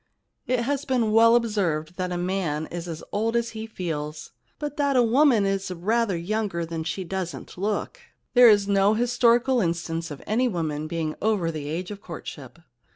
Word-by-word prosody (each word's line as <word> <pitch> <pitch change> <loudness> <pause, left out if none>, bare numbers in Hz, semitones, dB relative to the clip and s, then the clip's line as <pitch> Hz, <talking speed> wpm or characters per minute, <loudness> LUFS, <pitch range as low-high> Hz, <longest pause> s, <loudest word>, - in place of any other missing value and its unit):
It 250 -1 +1
has 280 +3 -1
been 250 -6 +1
well 230 +1 +6
observed 180 -9 0
that 180 -1 -2
a 175 - -2
man 175 -4 -1
is 175 0 -5
as 165 -2 -6
old 225 +3 0
as 235 0 0
he 220 0 -6
feels, 155 -7 -5 0.3
but 295 -1 -5
that 285 -2 +1
a 250 - +5
woman 240 -2 +4
is 195 -1 -1
rather 200 +3 0
younger 190 -1 -2
than 165 -1 -4
she 170 +4 -3
doesn't 185 -1 -5
look. 205 +3 -2 0.3
There 245 -1 +8
is 205 -2 +4
no 200 +1 +3
historical 240 +2 +3
instance 165 -2 -2
of 145 -3 -9
any 240 +5 +1
woman 155 -7 -2
being 160 -1 -2
over 200 -6 +1
the 150 -2 -5
age 175 +5 -4
of 205 -1 -8
courtship.' 145 -7 -9
195 Hz, 180 wpm, -25 LUFS, 165-230 Hz, 0.3 s, There